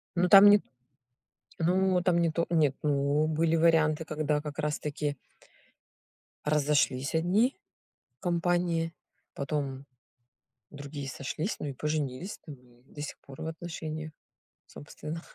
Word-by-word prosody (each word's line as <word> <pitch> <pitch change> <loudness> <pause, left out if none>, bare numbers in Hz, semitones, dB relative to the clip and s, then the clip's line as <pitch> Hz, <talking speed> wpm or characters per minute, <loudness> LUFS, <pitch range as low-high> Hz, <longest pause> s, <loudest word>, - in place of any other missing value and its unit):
Ну, 180 +1 +3
там 200 +1 +11
не 205 - +8
т - - -20 1.0
Ну, 180 +2 +2
там 180 -2 +3
не 170 - +3
то 170 +1 0
нет, 155 -5 +2
ну, 145 +1 +2
были 160 +1 +1
варианты, 160 -1 +3
когда, 150 -1 -1
как 150 0 -7
раз-таки 150 -1 -2 1.3
разошлись 145 -3 +1
одни 190 +11 +2 0.7
компании, 175 -1 0 0.4
потом 140 -2 -3 0.8
другие 145 -1 -7
сошлись, 150 - -3
ну, - - -5
и - - -4
поженились, 150 +5 -3
там, 150 - -8
и 125 -1 -24
до 145 - -12
сих 150 - -6
пор 135 -1 -13
в - - -4
отношениях, 160 -1 -6 0.5
собственно. 155 +3 -8
155 Hz, 125 wpm, -29 LUFS, 145-170 Hz, 1.3 s, там